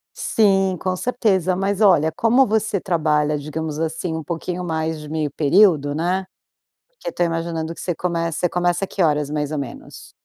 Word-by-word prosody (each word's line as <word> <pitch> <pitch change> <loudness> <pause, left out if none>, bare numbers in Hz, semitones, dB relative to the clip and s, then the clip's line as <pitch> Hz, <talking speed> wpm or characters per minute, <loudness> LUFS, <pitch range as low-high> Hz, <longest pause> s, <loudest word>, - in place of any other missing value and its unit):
Sim, 195 -3 +2
com 185 +2 -2
certeza. 190 -5 +1
Mas 195 +1 -1
olha, 160 -7 +4
como 235 - +3
você 215 -3 0
trabalha, 150 -4 +1
digamos 155 +1 -5
assim, 165 +1 -2
um 160 -1 -4
pouquinho 175 +2 -4
mais 160 -2 -2
de 150 - -9
meio 155 -2 -2
período, 150 -2 +3
né? 180 +4 -1 0.6
Porque - - -13
eu - - -3
tô - - 0
imaginando 165 -1 -2
que - - -13
você 175 - -2
começa 170 -2 -2
você 180 - +1
começa 175 +1 0
que 195 - -3
horas 150 -3 +2
mais 150 -1 -2
ou 155 - -2
menos? 140 -4 -8
170 Hz, 180 wpm, -21 LUFS, 155-190 Hz, 0.6 s, olha